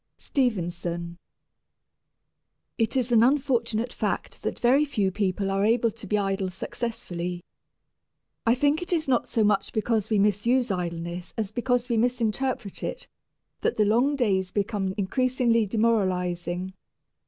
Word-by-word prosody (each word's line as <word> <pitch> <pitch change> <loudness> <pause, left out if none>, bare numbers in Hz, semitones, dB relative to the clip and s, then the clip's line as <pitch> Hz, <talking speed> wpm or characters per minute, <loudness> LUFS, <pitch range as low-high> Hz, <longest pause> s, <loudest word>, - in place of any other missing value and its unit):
STEVENSON. 175 - -2 1.6
It 225 +3 +1
is 250 -1 0
an 230 -2 +6
unfortunate 245 -3 +1
fact - - -3
that - - -3
very 260 +5 +4
few 210 -10 0
people 195 0 -1
are 195 +1 +1
able 230 +1 +3
to 220 -1 -11
be 210 - +1
idle 195 -1 -1
successfully. 180 -4 -4 1.0
I 230 +1 +3
think 290 +4 +2
it 355 - -4
is 320 -4 +1
not 250 -3 +2
so 225 - +1
much 205 -2 +2
because 220 -1 0
we 215 - +2
misuse 210 +4 +2
idleness 175 -1 -4
as 215 -3 -2
because 245 +1 0
we 235 -2 0
misinterpret 245 -1 -1
it - - -4 0.5
that - - 0
the 210 - +4
long 245 +7 +3
days 195 -8 +1
become 195 -1 -1
increasingly 235 +1 +1
demoralizing. 185 -5 0
215 Hz, 135 wpm, -26 LUFS, 190-245 Hz, 1.6 s, an